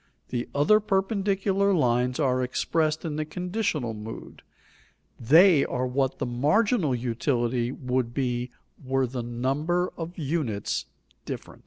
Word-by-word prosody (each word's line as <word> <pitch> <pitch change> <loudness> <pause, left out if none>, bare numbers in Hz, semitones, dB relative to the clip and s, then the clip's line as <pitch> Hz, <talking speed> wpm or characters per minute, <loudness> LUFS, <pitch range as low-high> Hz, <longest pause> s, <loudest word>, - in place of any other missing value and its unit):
The 120 -1 -3
other 150 +10 +5
perpendicular 195 -1 +1
lines 125 -3 +1
are 130 -3 +2
expressed 155 +5 0
in 155 -2 -3
the 155 - 0
conditional 175 - -2
mood; 110 +1 -9 0.8
they 160 - +6
are 125 0 -2
what 130 +1 0
the - - -2
marginal 150 - +2
utility 120 0 -1
would 125 -2 -2
be 125 -1 -2 0.3
were 135 0 +1
the 125 0 -4
numbers 135 +10 -1
of 170 +2 -6
units 140 - -2 0.4
different. - - -7
135 Hz, 125 wpm, -26 LUFS, 125-175 Hz, 0.8 s, they